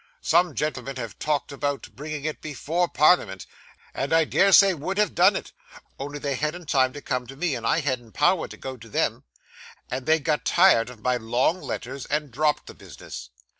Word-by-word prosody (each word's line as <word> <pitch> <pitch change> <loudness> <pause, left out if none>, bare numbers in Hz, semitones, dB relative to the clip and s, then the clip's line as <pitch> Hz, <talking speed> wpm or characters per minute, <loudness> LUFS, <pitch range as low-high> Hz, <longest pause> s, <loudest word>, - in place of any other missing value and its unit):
Some 175 -2 +3
gentlemen 135 -3 -3
have 115 -4 -7
talked 150 -1 -1
of 140 +1 -11 0.3
bringing 150 -1 -6
it 155 - -3
before 160 +4 -1
Parliament, 150 - +3 0.5
and 140 - -3
I 165 0 +4
dare 195 +5 +3
say 195 0 +7
would 175 +5 -4
have 210 -2 +2
done 185 +3 +5
it, - - -5 0.5
only 145 +2 -5
they 140 -1 -2
hadn't 150 +4 -3
time 130 -3 +3
to 145 - -9
come 125 -1 -2
to 135 - -10
me, 160 +1 -1
and 115 -2 -3
I 165 - +2
hadn't 125 -6 -3
power 160 +4 +2
to - - -11
go 130 -1 -7
to 115 0 -14
them, - - -1 0.7
and 130 +1 -4
they 160 0 +5
got 150 0 -1
tired 170 -11 +4
of 120 -3 -13
my 125 +2 +1
long 120 +10 0
letters, 130 +2 -6
and 150 -2 -2
dropped 150 +4 0
the - - -10
business. 60 -1 -10
145 Hz, 200 wpm, -25 LUFS, 125-160 Hz, 0.7 s, say